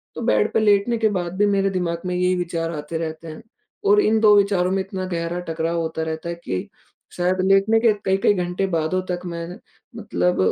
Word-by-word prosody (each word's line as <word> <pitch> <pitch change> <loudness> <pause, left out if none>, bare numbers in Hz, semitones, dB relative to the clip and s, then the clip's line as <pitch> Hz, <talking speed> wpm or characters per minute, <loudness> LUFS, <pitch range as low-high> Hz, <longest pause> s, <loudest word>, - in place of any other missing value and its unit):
तो - - -5
बेड 105 -1 +2
पे - - +3
लेटने 210 +2 +3
के 220 -1 +2
बाद 175 0 -4
भी 205 - +3
मेरे 195 -1 +2
दिमाग 175 -3 -2
में 180 0 -2
यही 180 0 +1
विचार 170 -2 -2
आते 150 +2 -5
रहते 160 0 -5
हैं। 155 -1 -9 0.4
और 415 +1 +5
इन 220 +1 +2
2 210 -1 +6
विचारों 195 -2 +2
में 195 - +1
इतना 190 -1 -5
गहरा 170 +1 -2
टकराव 165 +1 -2
होता 160 0 -3
रहता 160 +1 -4
है 170 - -3
कि, 95 - -5 0.4
शायद 180 +1 0
लेटने 195 +3 +4
के 230 -1 +4
कई-कई 195 +2 +3
घंटे 180 0 -1
बादों 170 +1 0
तक 175 - -2
मैं 170 -1 -5 0.5
मतलब 90 0 -1
180 Hz, 205 wpm, -22 LUFS, 165-195 Hz, 0.5 s, 2